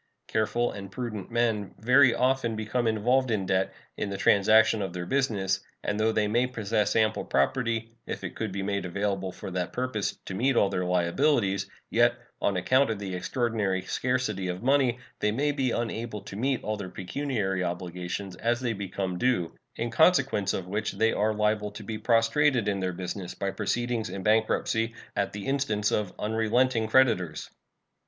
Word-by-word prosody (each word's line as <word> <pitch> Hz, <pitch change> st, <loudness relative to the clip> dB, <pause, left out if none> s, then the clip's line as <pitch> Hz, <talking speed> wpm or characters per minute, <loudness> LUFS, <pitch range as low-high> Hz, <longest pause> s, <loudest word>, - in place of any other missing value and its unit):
Careful 120 Hz, +2 st, 0 dB
and 100 Hz, -1 st, -8 dB
prudent 110 Hz, -3 st, -5 dB
men 115 Hz, -4 st, 0 dB
very 125 Hz, +2 st, +5 dB
often 125 Hz, -3 st, +1 dB
become 110 Hz, +3 st, -1 dB
involved 125 Hz, +4 st, +2 dB
in 105 Hz, -4 st, 0 dB
debt 95 Hz, 0 st, +1 dB, 0.3 s
in 100 Hz, -, -2 dB
the 100 Hz, -, -4 dB
transaction 110 Hz, +2 st, +5 dB
of 95 Hz, -3 st, -3 dB
their 90 Hz, -1 st, -4 dB
business, 100 Hz, -7 st, 0 dB, 0.2 s
and 105 Hz, 0 st, -1 dB
though 110 Hz, +1 st, +3 dB
they 110 Hz, -1 st, +1 dB
may 120 Hz, +4 st, +2 dB
possess 110 Hz, -3 st, 0 dB
ample 110 Hz, -1 st, +2 dB
property, 115 Hz, -, 0 dB, 0.2 s
if -, -, -5 dB
it -, -, -5 dB
could 110 Hz, -3 st, -3 dB
be 100 Hz, +1 st, -3 dB
made 100 Hz, 0 st, -1 dB
available 95 Hz, +1 st, -2 dB
for 95 Hz, -, -8 dB
that 90 Hz, 0 st, -3 dB
purpose, 125 Hz, -5 st, -2 dB
to -, -, -5 dB
meet 125 Hz, +7 st, +1 dB
all 100 Hz, -, +4 dB
their 90 Hz, -2 st, -1 dB
liabilities, 95 Hz, -, +1 dB, 0.2 s
yet, 120 Hz, +1 st, +4 dB, 0.3 s
on 100 Hz, -, +1 dB
account 130 Hz, +9 st, +3 dB
of 110 Hz, -, -1 dB
the 100 Hz, -2 st, -5 dB
extraordinary 95 Hz, 0 st, -1 dB
scarcity 115 Hz, -4 st, -1 dB
of 90 Hz, +2 st, -4 dB
money, 130 Hz, -2 st, +3 dB, 0.2 s
they 105 Hz, -, +1 dB
may 145 Hz, +6 st, +1 dB
be 135 Hz, -3 st, 0 dB
unable 115 Hz, -2 st, -3 dB
to 100 Hz, -1 st, -9 dB
meet 130 Hz, +3 st, 0 dB
all 110 Hz, 0 st, -2 dB
their 95 Hz, -3 st, -6 dB
pecuniary 95 Hz, -2 st, -2 dB
obligations 90 Hz, +2 st, -4 dB
as 120 Hz, +3 st, 0 dB
they 120 Hz, -3 st, -1 dB
become 95 Hz, -2 st, -3 dB
due, 120 Hz, -10 st, +1 dB, 0.2 s
in 120 Hz, 0 st, -3 dB
consequence 135 Hz, -, +3 dB
of 95 Hz, -, -3 dB
which 105 Hz, +4 st, -2 dB
they 115 Hz, 0 st, +2 dB
are 105 Hz, +1 st, +1 dB
liable 105 Hz, 0 st, 0 dB
to 105 Hz, +1 st, -9 dB
be 110 Hz, -1 st, -5 dB
prostrated 115 Hz, +2 st, +3 dB
in 100 Hz, -2 st, 0 dB
their 95 Hz, -1 st, -1 dB
business 90 Hz, +1 st, -5 dB
by 100 Hz, 0 st, -2 dB
proceedings 115 Hz, +2 st, -1 dB
in 95 Hz, +1 st, -6 dB
bankruptcy 110 Hz, +1 st, +1 dB, 0.2 s
at -, -, 0 dB
the 100 Hz, -1 st, -6 dB
instance 135 Hz, -7 st, 0 dB
of 105 Hz, -3 st, 0 dB
unrelenting 110 Hz, +2 st, +1 dB
creditors. 110 Hz, -10 st, +2 dB
110 Hz, 175 wpm, -27 LUFS, 95-120 Hz, 0.3 s, very